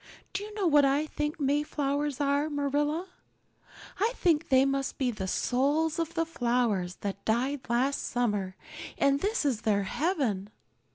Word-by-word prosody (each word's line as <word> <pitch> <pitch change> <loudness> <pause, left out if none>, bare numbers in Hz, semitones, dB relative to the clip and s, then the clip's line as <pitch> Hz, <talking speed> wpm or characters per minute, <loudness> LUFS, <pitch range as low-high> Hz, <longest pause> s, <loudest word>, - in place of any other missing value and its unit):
Do 380 - -2
you 425 - -8
know 405 -3 -1
what 295 -4 +5
I 280 +2 +3
think 300 0 -3
Mayflowers 290 0 0
are, 285 +1 +1
Marilla? 295 +4 0 0.9
I 445 +5 +2
think 330 -3 +1
they 265 0 +5
must 275 -1 -1
be 255 -2 +1
the 190 -4 -5
souls 290 - +1
of 330 0 -2
the 330 -1 +1
flowers 235 - 0
that 200 -1 -4
died 255 +4 -1
last 255 +4 +1
summer 205 -6 -1 0.4
and 280 0 +3
this 410 -2 0
is 250 -7 +1
their 205 -2 +1
heaven. 230 - -1
280 Hz, 155 wpm, -29 LUFS, 240-300 Hz, 0.9 s, what